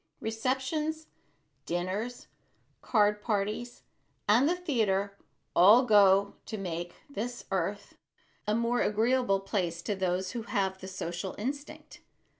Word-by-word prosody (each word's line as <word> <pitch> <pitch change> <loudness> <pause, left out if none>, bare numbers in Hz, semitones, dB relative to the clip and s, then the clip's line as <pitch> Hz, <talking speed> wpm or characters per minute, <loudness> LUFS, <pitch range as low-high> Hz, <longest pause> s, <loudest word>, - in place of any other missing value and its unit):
Receptions, 265 +8 -2 0.6
dinners, 190 +8 -3 0.6
card 210 -2 +2
parties 215 +3 -2 0.4
and 240 +8 +5
the 355 - +2
theater 210 - 0 0.4
all 215 +8 +7
go 200 -3 +5
to 220 - -4
make 175 -2 -4
this 245 -3 -5
earth - - -2 0.5
a 210 - +2
more 235 +1 +1
agreeable 220 -2 +2
place 175 -4 -2
to 205 - -1
those 185 0 -1
who 240 - -4
have 195 -4 -1
the 190 - -8
social 185 0 -5
instinct. 280 +7 -6
210 Hz, 115 wpm, -30 LUFS, 190-245 Hz, 0.6 s, all